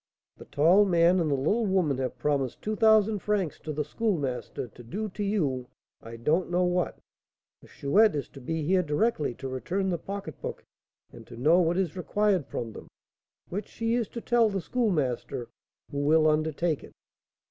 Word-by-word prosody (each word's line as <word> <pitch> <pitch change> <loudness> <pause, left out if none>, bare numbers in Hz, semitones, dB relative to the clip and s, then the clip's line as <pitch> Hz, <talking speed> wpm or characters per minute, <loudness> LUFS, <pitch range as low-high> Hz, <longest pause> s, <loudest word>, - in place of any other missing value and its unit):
"The - - -12
tall 170 +8 +4
man 175 -1 +4
and 165 -3 +1
the 140 - +2
little 205 - +1
woman 175 -9 +1
have 130 -1 -3
promised 135 -1 -1
two 215 +1 -1
thousand 220 -1 +4
francs 195 -6 -1
to 155 - -6
the 150 0 -2
Schoolmaster 145 - -2
to 120 - -14
do 210 - -4
to 205 +2 -5
you 145 -12 -1 0.3
I 115 0 -9
don't 155 +11 0
know 180 +1 +2
what. 180 0 0 0.6
The - - -17
Chouette 200 +6 +3
is 145 - -3
to 135 - -12
be 160 +4 -3
here 185 +4 +3
directly 150 - 0
to 135 - -6
return 180 +9 -2
the 170 - -1
pocketbook, 195 -5 -6 0.5
and 115 -2 -12
to 120 - -11
know 155 +8 +4
what 175 0 +2
is 190 -4 -1
required 190 -2 +1
from 115 -2 -5
them, - - -10 0.6
which 200 +4 -4
she 230 0 -2
is 235 -3 0
to 235 - -7
tell 235 -2 +3
the 195 -1 -2
Schoolmaster, 155 - -1 0.4
who 140 - -3
will 155 +2 +4
undertake 155 0 0
it." - - -13
170 Hz, 180 wpm, -28 LUFS, 140-200 Hz, 0.6 s, tall